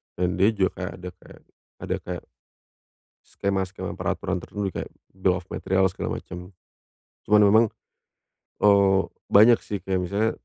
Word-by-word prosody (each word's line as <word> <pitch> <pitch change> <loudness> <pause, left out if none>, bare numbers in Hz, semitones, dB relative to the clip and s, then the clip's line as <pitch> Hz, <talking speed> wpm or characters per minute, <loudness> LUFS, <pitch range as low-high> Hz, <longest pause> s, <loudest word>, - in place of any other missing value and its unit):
dan 90 +1 -1
dia 100 - +5
juga 100 -4 +1
kayak 90 +1 -4
ada 90 0 -8
kayak - - -16 0.4
ada - - -1
kayak, 90 -1 -5 1.0
skema-skema 95 -1 -3
peraturan 95 - -2
tertentu 105 -1 -4
nih - - -14
kayak - - -13 0.2
dough 95 -1 +1
materials, 95 0 +1
segala - - -3
macem. 90 +2 -10 0.8
Cuman 105 +1 +5
memang, 110 +2 +6 1.0
eee, 100 -2 +5 0.3
banyak 110 +4 +7
sih 105 - -4
kayak 95 -1 -1
misalnya, 105 +4 0
95 Hz, 140 wpm, -24 LUFS, 90-100 Hz, 1.0 s, banyak